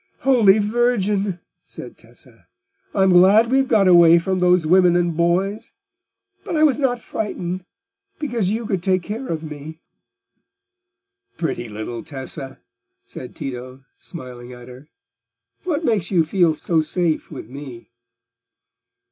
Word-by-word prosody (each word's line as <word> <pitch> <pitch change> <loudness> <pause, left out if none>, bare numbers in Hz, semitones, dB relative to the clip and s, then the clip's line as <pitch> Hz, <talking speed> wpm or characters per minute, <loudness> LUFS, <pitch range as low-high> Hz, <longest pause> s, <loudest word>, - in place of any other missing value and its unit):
"Holy 230 -7 +5
Virgin!" 210 -4 0 0.2
said - - -10
Tessa; - - -17 0.5
"I 195 - +3
am 190 - +4
glad 200 +6 +5
we 265 - +4
have 270 - +1
got 210 -5 +3
away 170 -2 +7
from 185 +2 -1
those 180 -2 +3
women 180 +1 +4
and 175 -2 +1
boys; 190 +6 -1 0.7
but 325 - -3
I 305 - +3
was 295 -3 +3
not 250 -3 0
frightened, 185 -5 -5 0.5
because 240 -10 -2
you 225 +3 -2
could 195 -5 -2
take 185 0 0
care 225 +8 -6
of 160 -1 -4
me." 155 +1 -9 1.6
"Pretty 120 -8 -3
little 110 +2 -6
Tessa!" 135 -1 -8 0.5
said 125 - -10
Tito, 130 0 -8
smiling 125 -6 -10
at 125 0 -13
her. 130 +4 -13 0.8
"What 335 -2 -1
makes 205 - 0
you 170 -5 +2
feel 170 -1 +2
so 160 +1 0
safe 165 0 -2
with 135 -8 -9
me?" 130 -3 -10
180 Hz, 140 wpm, -21 LUFS, 155-210 Hz, 1.6 s, away